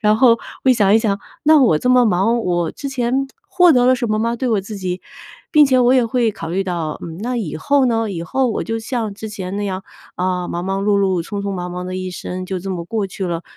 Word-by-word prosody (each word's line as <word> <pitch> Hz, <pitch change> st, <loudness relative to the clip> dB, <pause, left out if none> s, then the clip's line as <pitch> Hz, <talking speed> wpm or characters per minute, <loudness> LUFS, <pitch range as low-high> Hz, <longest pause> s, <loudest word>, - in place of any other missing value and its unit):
“然 215 Hz, -1 st, +3 dB
后 235 Hz, -1 st, +5 dB, 0.3 s
我 260 Hz, -, +5 dB
一 -, -, +7 dB
想 205 Hz, -4 st, +3 dB
一 -, -, +6 dB
想：” 205 Hz, -3 st, 0 dB, 0.3 s
那 310 Hz, 0 st, +6 dB
我 160 Hz, -11 st, +4 dB
这 250 Hz, -, +1 dB
么 250 Hz, -2 st, +5 dB
忙， 210 Hz, +5 st, +2 dB
我 175 Hz, -6 st, 0 dB
之 280 Hz, -, -6 dB
前 265 Hz, 0 st, -1 dB, 0.2 s
获 365 Hz, -3 st, +4 dB
得 250 Hz, -3 st, +4 dB
了 255 Hz, +1 st, +5 dB
什 240 Hz, -1 st, -2 dB
么 215 Hz, 0 st, 0 dB
吗？ 230 Hz, +1 st, 0 dB
对 255 Hz, +1 st, -2 dB
我 220 Hz, -4 st, +2 dB
自 210 Hz, +2 st, -7 dB
己。 185 Hz, -1 st, -4 dB, 0.5 s
“并 300 Hz, -2 st, +7 dB
且 260 Hz, -1 st, +3 dB
我 250 Hz, 0 st, +4 dB
也 255 Hz, -3 st, +3 dB
会 235 Hz, -1 st, +1 dB
考 165 Hz, -, -7 dB
虑 190 Hz, +4 st, -1 dB
到： 170 Hz, -5 st, -3 dB
“嗯， 165 Hz, 0 st, -8 dB
那 245 Hz, +3 st, -2 dB
以 195 Hz, -11 st, -3 dB
后 280 Hz, -, +2 dB
呢？ 225 Hz, -3 st, 0 dB
以 170 Hz, -4 st, -4 dB
后 260 Hz, +10 st, 0 dB
我 225 Hz, -, -2 dB
就 225 Hz, 0 st, -2 dB
像 225 Hz, -2 st, -3 dB
之 220 Hz, +2 st, -7 dB
前 195 Hz, -3 st, -6 dB
那 205 Hz, 0 st, -2 dB
样， 190 Hz, -1 st, -4 dB, 0.3 s
啊， 180 Hz, -1 st, -2 dB
忙 175 Hz, +1 st, -3 dB
忙 195 Hz, +1 st, -2 dB
碌 205 Hz, 0 st, +2 dB
碌、 190 Hz, -3 st, +1 dB
匆 200 Hz, +3 st, -5 dB
匆 200 Hz, 0 st, -3 dB
忙 180 Hz, -1 st, -4 dB
忙 180 Hz, 0 st, -5 dB
地 185 Hz, 0 st, -5 dB
一 185 Hz, 0 st, -4 dB
生 185 Hz, +1 st, -6 dB
就 190 Hz, 0 st, -3 dB
这 195 Hz, +2 st, -6 dB
么 175 Hz, -2 st, -4 dB
过 210 Hz, 0 st, -2 dB
去 190 Hz, 0 st, -5 dB
了， 170 Hz, -1 st, -3 dB
205 Hz, 290 characters per minute, -19 LUFS, 185-240 Hz, 0.5 s, 一